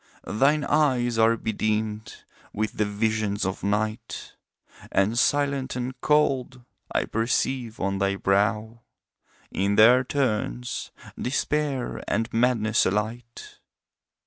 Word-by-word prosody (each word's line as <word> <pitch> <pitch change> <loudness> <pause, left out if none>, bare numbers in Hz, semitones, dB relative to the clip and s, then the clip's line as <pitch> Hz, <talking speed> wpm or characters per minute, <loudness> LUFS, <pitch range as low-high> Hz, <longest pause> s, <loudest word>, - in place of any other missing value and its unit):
Thine 145 +7 +2
eyes 130 -6 +1
are 115 +1 +4
bedimmed 110 0 -3 0.3
with 110 +1 -3
the 105 - +2
visions 105 -1 -1
of 95 0 -4
Night, 110 +2 -2 0.6
And 100 +4 +2
silent 140 -1 +1
and 125 +1 -3
cold 135 -4 +1 0.3
I - - 0
perceive 115 +1 -1
on 95 0 -1
thy 100 0 +1
brow 105 +4 0 0.7
In 100 +1 0
their 120 +5 +7
turns 105 - -2 0.3
Despair 140 0 -1
and 115 +3 -1
Madness 115 -2 +2
alight. 110 +4 -4
115 Hz, 105 wpm, -25 LUFS, 105-130 Hz, 0.7 s, their